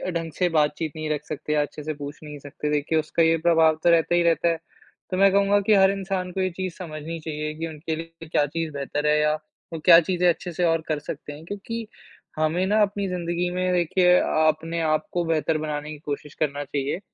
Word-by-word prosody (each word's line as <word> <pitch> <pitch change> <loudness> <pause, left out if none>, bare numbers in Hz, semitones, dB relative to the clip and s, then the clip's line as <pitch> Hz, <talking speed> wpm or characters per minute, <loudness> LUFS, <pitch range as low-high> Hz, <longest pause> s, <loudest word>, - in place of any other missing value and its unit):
ढंग 165 -1 -3
से 180 +4 0
बातचीत 155 0 +1
नहीं 155 -1 -4
रख 150 -1 -2
सकते 150 +1 -4
या 150 - +3
अच्छे 145 +1 -5
से 155 0 -3
पूछ 145 0 -8
नहीं 150 -1 -8
सकते, 145 +1 -5
देखिए 150 +2 +1
उसका 155 +2 +1
ये 165 0 +4
प्रभाव 160 -2 +5
तो 175 - +5
रहता 170 +1 +3
ही 175 - +4
रहता 170 0 +2
है। 165 - 0 0.5
तो 185 - -1
मैं 195 0 +5
कहूँगा 200 +1 +3
कि 215 - +6
हर 190 0 +5
इंसान 190 -2 -3
को 190 - -2
ये 185 - +1
चीज़ 185 0 -4
समझनी 165 -1 -6
चाहिए 155 -1 -4
कि 165 - -2
उनके 160 +1 -4
लिए 165 0 -9
क्या 145 - +3
चीज़ 160 +2 -3
बेहतर 145 +2 -2
है 150 0 +4
या 150 0 +3 0.4
वो 160 - -4
क्या 170 -2 +10
चीज़ें 180 +1 +1
अच्छे 175 +1 -2
से 180 - -1
और 165 -1 +2
कर 155 -2 -1
सकते 145 0 -7
हैं। 155 +3 -12
क्योंकि, 215 +4 -6 0.5
हमें 160 +4 +1
ना 215 +1 +3
अपनी 200 -1 0
ज़िंदगी 175 0 -2
में 185 0 0
देखिए 180 +1 +3
अपने 160 +1 +1
आप 155 -1 0
को 175 -1 +1
बेहतर 160 -1 +1
बनाने 150 -1 -4
की 155 - -7
कोशिश 145 0 -5
करना 145 -1 -1
चाहिए, 140 +4 -3
165 Hz, 230 wpm, -24 LUFS, 150-180 Hz, 0.5 s, क्या